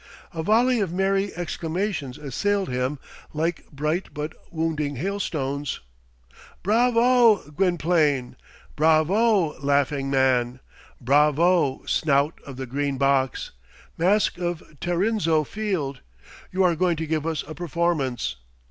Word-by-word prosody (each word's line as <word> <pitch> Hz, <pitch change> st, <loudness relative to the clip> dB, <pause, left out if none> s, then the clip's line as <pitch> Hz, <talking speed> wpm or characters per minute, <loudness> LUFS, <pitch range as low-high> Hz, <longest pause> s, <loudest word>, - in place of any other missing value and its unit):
A 165 Hz, -, -3 dB
volley 235 Hz, +7 st, +3 dB
of 195 Hz, -5 st, -1 dB
merry 195 Hz, +2 st, +1 dB
exclamations 170 Hz, -4 st, -3 dB
assailed 195 Hz, +8 st, -1 dB
him 125 Hz, +3 st, -1 dB, 0.4 s
like 165 Hz, +2 st, -2 dB
bright 155 Hz, +5 st, -2 dB
but 150 Hz, +1 st, -4 dB, 0.2 s
wounding 160 Hz, -3 st, -2 dB
hailstones. 145 Hz, -5 st, -3 dB, 0.8 s
"Bravo, 230 Hz, -, +4 dB
Gwynplaine!" 155 Hz, -6 st, +1 dB, 0.4 s
"Bravo, 160 Hz, +4 st, +3 dB
Laughing 140 Hz, -1 st, +1 dB
Man!" 130 Hz, -2 st, +2 dB, 0.4 s
"Bravo, 150 Hz, +3 st, +3 dB
Snout 145 Hz, 0 st, +1 dB
of 135 Hz, -2 st, -8 dB
the 130 Hz, -, -4 dB
Green 140 Hz, +2 st, -2 dB
Box!" 135 Hz, -1 st, +1 dB, 0.4 s
"Mask 185 Hz, +2 st, +2 dB
of 175 Hz, -2 st, -3 dB, 0.2 s
Tarrinzeau 175 Hz, -3 st, +1 dB
Field!" 170 Hz, -7 st, -3 dB, 0.5 s
"You 190 Hz, +1 st, +1 dB
are 175 Hz, -2 st, +3 dB
going 175 Hz, +1 st, +1 dB
to 160 Hz, -, -3 dB
give 155 Hz, 0 st, -1 dB
us 160 Hz, -3 st, -2 dB
a 155 Hz, -, -6 dB
performance." 150 Hz, -, -1 dB
160 Hz, 110 wpm, -24 LUFS, 140-185 Hz, 0.8 s, Bravo